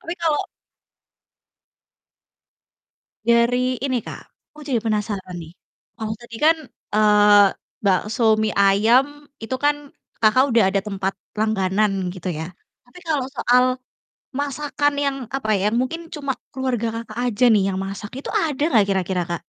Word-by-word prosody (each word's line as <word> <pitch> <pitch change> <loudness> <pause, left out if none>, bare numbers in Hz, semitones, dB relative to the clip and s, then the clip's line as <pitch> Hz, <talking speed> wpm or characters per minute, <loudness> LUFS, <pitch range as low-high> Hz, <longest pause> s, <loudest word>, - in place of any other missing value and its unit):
tapi 335 - -5
kalau 310 -3 +1 2.9
dari 245 +2 +2
ini, 260 -2 0
Kak, - - -8 0.3
aku 300 - -13
jadi 245 - +2
penasaran 210 -4 -2
nih, 160 - -10 0.5
kalau 220 -1 -3
tadi 235 -1 -11
kan, 325 +1 +5 0.4
eee, 210 -1 +6 0.4
bakso 215 +3 +2
mie 215 -1 0
ayam 235 +9 +3 0.2
itu 260 +4 -3
kan 290 +2 +2 0.5
Kakak 225 +4 +5
udah 230 - +5
ada 195 0 0
tempat 195 -1 -2 0.3
langganan 195 -3 0
gitu 185 -1 -5
ya, 160 +2 -5 0.3
tapi 245 +9 -15
kalau 310 -6 -1
soal 250 +1 +4 0.7
masakan 290 +1 -1
yang, 280 -1 0 0.2
apa, 265 -5 -3
yang 205 +3 0
mungkin 330 +6 -4
cuma 280 -3 -3 0.2
keluarga 250 -3 -2
Kakak 225 -1 -10 0.2
aja 210 +4 -1
nih 215 -4 +4
yang 190 - -3
masak, 195 +2 -6
itu - - -8 0.2
ada 295 -2 -1
nggak 215 -9 +4
kira-kira, 185 -2 0
Kak? 170 -1 -3
220 Hz, 140 wpm, -22 LUFS, 200-265 Hz, 2.9 s, eee